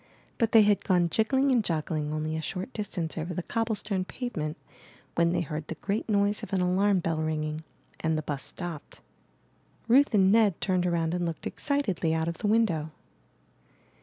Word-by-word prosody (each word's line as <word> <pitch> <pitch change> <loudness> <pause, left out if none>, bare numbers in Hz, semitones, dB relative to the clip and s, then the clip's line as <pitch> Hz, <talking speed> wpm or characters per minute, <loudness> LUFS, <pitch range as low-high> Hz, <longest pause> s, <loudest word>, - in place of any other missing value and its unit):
But 230 -2 +2
they 225 -2 +8
had 205 -1 +3
gone 175 -3 +2
jiggling 265 +5 +2
and 240 -4 +3
joggling 155 -3 -2
only 155 +1 -2
a 160 - -2
short 185 - -4
distance 180 -7 -3
over 170 +2 -4
the 180 - -3
cobble 225 +2 -1
stone 200 -3 -2
pave 245 +6 -6
ment, 155 0 -3 0.6
when 170 0 +2
they - - +1
heard 155 -1 -5
the 165 - -5
great 205 +6 -3
noise 205 0 +2
of - - -8
an 190 - +2
alarm 185 +1 +2
bell 165 -2 -1
ringing, 155 0 -2 0.4
and 160 -1 0
the 155 - -2
bus 145 -2 -3
stopped. 175 -5 -6 0.9
Ruth 260 +1 +5
and 190 -1 +5
Ned 210 -5 +4
turned 185 -2 +1
around 165 -1 0
and 180 0 -1
looked 165 -2 -4
excitedly 200 - 0
out 160 0 0
of 170 -1 -4
the - - -1
win 225 +2 +4
dow. 160 -5 -3
180 Hz, 190 wpm, -28 LUFS, 160-210 Hz, 0.9 s, they